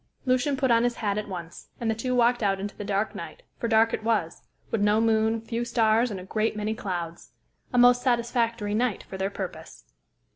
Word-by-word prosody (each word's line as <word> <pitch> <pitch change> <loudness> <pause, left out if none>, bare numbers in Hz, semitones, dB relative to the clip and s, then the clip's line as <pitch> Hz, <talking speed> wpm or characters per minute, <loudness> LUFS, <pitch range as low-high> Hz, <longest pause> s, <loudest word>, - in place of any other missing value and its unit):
Lucian 265 +2 +1
put 265 -2 +2
on 230 0 +4
his 240 -1 +1
hat 205 -2 -1
at 210 - -5
once, 175 -3 -8
and 235 - -2
the 225 - +2
two 250 +3 -2
walked 240 0 +3
out 195 -2 +1
into 205 +1 -5
the - - -6
dark 200 +1 -1
night, - - -8 0.2
for 235 - -1
dark 225 0 +4
it - - -2
was, 215 -8 0 0.3
with 225 - 0
no 210 +1 +3
moon, 225 0 +2
few 230 +1 -3
stars, 235 0 +2
and 200 -3 -5
a - - -8
great 215 +3 -1
many 210 +1 -1
clouds. 175 -6 -5 0.4
A 250 - -1
most 245 0 +6
satisfactory 235 -3 0
night 235 -1 0
for 190 - -9
their 190 +1 0
purpose. 160 - -7
225 Hz, 215 wpm, -26 LUFS, 205-240 Hz, 0.4 s, most